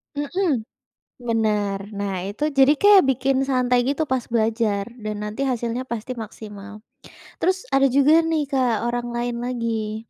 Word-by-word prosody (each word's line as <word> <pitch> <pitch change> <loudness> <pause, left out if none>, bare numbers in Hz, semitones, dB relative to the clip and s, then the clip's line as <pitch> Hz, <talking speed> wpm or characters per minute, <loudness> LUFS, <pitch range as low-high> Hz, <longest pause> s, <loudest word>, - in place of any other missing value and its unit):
Mhm. 290 - -1 0.5
Benar. 215 -4 -1 0.2
Nah, 195 -2 -2
itu 295 +9 -2
jadi 275 +1 +5
kayak 405 +1 +7
bikin 265 +1 +1
santai 250 -1 +2
gitu 285 +3 0
pas 260 -3 0
belajar 220 -3 0 0.2
dan 215 0 -4
nanti 210 +6 -4
hasilnya 240 0 -2
pasti 235 +2 -4
maksimal. 210 -2 -9 0.6
Terus 375 +6 0
ada 270 - +4
juga 295 +5 +5
nih, 315 -3 0
Kak, 240 -4 +1
orang 240 0 -2
lain 240 0 -2
lagi. 225 -3 -3
240 Hz, 145 wpm, -22 LUFS, 215-275 Hz, 0.6 s, kayak